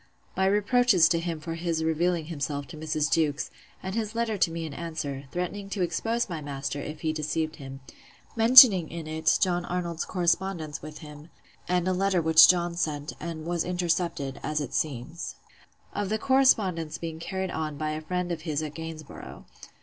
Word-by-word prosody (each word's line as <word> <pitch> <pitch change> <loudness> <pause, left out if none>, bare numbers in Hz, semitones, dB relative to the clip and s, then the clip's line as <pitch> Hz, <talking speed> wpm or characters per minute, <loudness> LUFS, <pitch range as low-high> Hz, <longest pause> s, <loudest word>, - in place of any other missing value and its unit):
My 190 0 +2
reproaches 205 -2 +4
to 170 - +2
him 165 -1 -3
for 165 +1 -5
his 165 -1 -2
revealing 165 +1 0
himself 145 -3 -4
to - - -9
Mrs. 155 0 -1
Jewkes; 150 -3 0 0.3
and 190 0 -4
his 220 0 -3
letter 230 -2 0
to 185 - +2
me 165 0 -4
in 155 - -7
answer, 150 -5 -5
threatening 195 +3 -4
to 195 -2 -1
expose 230 +6 -1
my 165 -5 -5
master, 140 0 -4
if 150 +2 -7
he 155 -1 0
deceived 155 +1 -2
him; 135 -2 -9 0.5
mentioning 225 - +8
in 165 -1 -6
it 155 0 +1
John 175 -2 +1
Arnold's 175 -2 -3
correspondence 175 -3 -1
with 155 0 -9
him; 150 +1 -11 0.4
and 180 0 +1
a 185 - +2
letter 190 0 +1
which 160 -1 +8
John 175 -1 +2
sent, 150 -3 -2
and 160 -1 -6
was 170 -1 -1
intercepted, 170 -6 -1
as 150 +1 -2
it 145 -4 -5
seems. 155 +3 -3 0.6
Of 205 -2 -2
the 215 - 0
correspondence 215 - +2
being 165 -1 -6
carried 190 +2 -3
on 155 -2 -3
by 155 0 -2
a 155 0 -4
friend 180 +2 -3
of 165 -2 -3
his 155 -1 -2
at 150 -1 -5
Gainsborough. 155 - -9
165 Hz, 180 wpm, -27 LUFS, 155-180 Hz, 0.6 s, mentioning